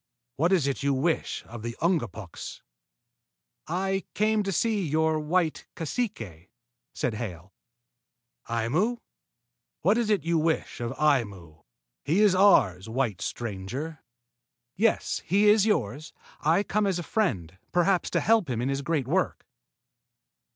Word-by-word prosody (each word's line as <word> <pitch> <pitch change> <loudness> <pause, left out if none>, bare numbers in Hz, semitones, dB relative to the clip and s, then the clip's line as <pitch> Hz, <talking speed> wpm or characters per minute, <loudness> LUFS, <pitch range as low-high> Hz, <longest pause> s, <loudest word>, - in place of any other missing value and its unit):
What 165 +6 +2
is 180 -7 +3
it 140 -1 -1
you 140 -1 +1
wish 160 +5 -1
of 115 -1 -9
the 115 +1 -5
Ungapuks?" 115 - -3 1.0
"I 190 +3 -1
came 215 +1 +2
to 195 -1 -2
see 215 +4 +1
your 160 0 +1
white 160 +1 0
cacique," 140 - -4 0.4
said 120 - -2
Hale. 95 -5 -6 1.0
"Aimu? 145 - 0 0.9
What 205 +8 +4
is 230 -2 0
it 205 -8 +2
you 170 0 +1
wish 160 0 -1
of 120 0 -2
Aimu? 100 - -1 0.4
He 160 +7 +1
is 210 -3 +5
ours, 115 - +4
white 115 -5 -1
stranger." 120 +8 -5 0.7
"Yes, 220 +3 +1
he 200 +4 +3
is 210 0 +5
yours. 145 - -1 0.3
I 165 +6 +2
come 210 0 0
as 190 -3 0
a 175 - -4
friend, 95 - -1
perhaps 180 +1 +2
to - - 0
help 220 -8 +3
him 120 -3 -1
in 125 +3 -1
his 135 0 -1
great 140 -3 -1
work." 180 +6 0
155 Hz, 135 wpm, -27 LUFS, 115-195 Hz, 1.0 s, is